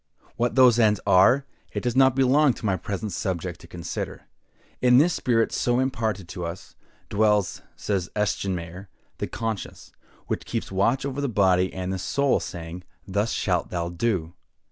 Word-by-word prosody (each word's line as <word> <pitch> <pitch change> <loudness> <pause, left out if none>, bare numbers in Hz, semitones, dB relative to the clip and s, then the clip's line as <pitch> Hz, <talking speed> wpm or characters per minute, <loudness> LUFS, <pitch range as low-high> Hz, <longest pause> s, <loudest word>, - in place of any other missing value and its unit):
What 120 +1 0
those 125 -3 +6
ends 105 -3 +4
are, 125 +9 +5 0.3
it - - -3
does 120 -1 -1
not 130 -1 +5
belong 135 +1 +4
to - - -8
my 95 -3 +2
present 100 +3 -4
subject 90 -3 -3
to - - -14
consider. 85 -3 -6 0.6
In 125 0 +6
this 165 +6 +4
spirit 115 -7 +1
so 120 0 +1
imparted 115 -8 -1
to 90 -1 -6
us, 85 +4 -7 0.3
dwells, 105 -2 +1
says 95 -4 -2
Eschenmayer, 95 -3 -2 0.3
the - - -2
conscience, 115 -3 -5 0.3
which - - -3
keeps - - -3
watch 115 +8 +1
over 140 0 -3
the 140 - -1
body 95 -4 +3
and 95 0 -4
the 95 - -3
soul, 140 +9 +1
saying, 85 0 -7 0.2
"Thus 105 +4 0
shalt 90 -3 0
thou 85 -1 -2
do!" 85 -3 -1
105 Hz, 165 wpm, -25 LUFS, 90-125 Hz, 0.6 s, those